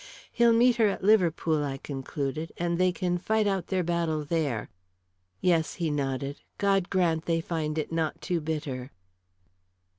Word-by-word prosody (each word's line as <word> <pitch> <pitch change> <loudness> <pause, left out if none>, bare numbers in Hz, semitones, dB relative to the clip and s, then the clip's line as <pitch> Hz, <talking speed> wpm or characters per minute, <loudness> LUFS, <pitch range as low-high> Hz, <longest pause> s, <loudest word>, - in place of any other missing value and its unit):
"He'll 235 -1 +4
meet 240 +1 +4
her 225 -2 +5
at 195 - -4
Liverpool," 170 -6 +3
I 135 -1 -3
concluded, 140 +3 -4
"and 170 0 -1
they 185 0 +4
can 175 0 -1
fight 220 +3 +1
out 195 -3 0
their 185 -2 0
battle 165 -3 -1
there." 145 -9 -1 0.7
"Yes," 165 -3 +2
he 165 -3 -1
nodded. 140 0 -2 0.2
"God 195 -2 +2
grant 170 -4 +1
they 165 -1 +1
find 160 -2 -2
it 155 - -2
not 160 -2 -1
too 175 -2 -1
bitter." 145 -5 -4
165 Hz, 155 wpm, -28 LUFS, 150-185 Hz, 0.7 s, her